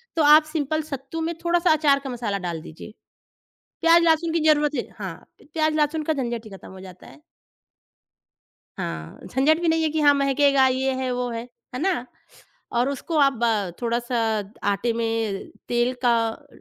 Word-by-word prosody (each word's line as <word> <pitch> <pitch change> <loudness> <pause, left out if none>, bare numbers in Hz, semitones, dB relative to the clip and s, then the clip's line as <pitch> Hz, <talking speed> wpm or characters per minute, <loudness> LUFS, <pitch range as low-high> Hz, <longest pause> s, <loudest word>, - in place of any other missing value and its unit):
तो 325 - +2
आप 300 +1 +8
सिंपल 310 0 -1
सत्तू 275 +4 -5
में 330 +1 -1
थोड़ा-सा 345 0 +2
अचार 290 -3 +3
का 270 - -5
मसाला 230 -5 -3
डाल 165 -2 -4
दीजिए। 160 +6 -11 0.9
प्याज़, 335 0 +6
लहसुन 325 0 +2
की 335 - +2
ज़रूरत 295 -1 +4
ही 245 - -3
हाँ, 190 -5 -5 0.3
प - - -19
प्याज़, 310 -1 +1
लहसुन 305 +1 +1
का 315 - 0
झंझट 240 -5 -3
ही - - -10
खत्म 195 - -11
हो 190 - -11
जाता 185 -1 -12
है। 135 +2 -16 1.6
हाँ, 80 0 -6
झंझट 290 +5 +2
भी 345 - 0
नहीं 325 0 +2
है 315 - +2
कि 315 +1 -2
हाँ 290 -1 +6
महकेगा, 275 -1 +3
ये 260 +1 0
है, 260 -1 -2
वो 250 0 -2
है, 230 +1 -5 0.3
है - - -3
ना? 360 -8 0 0.7
और 240 +2 +1
उसको 280 +4 -4
आप 275 -1 +5
ब 215 -5 +1
थोड़ा-सा 240 +1 -1 0.5
आटे 230 +4 0
में 225 -3 -2 0.2
तेल 240 +1 +1
का 240 -2 +4
अ, 255 +6 -9
270 Hz, 185 wpm, -23 LUFS, 235-310 Hz, 1.6 s, आप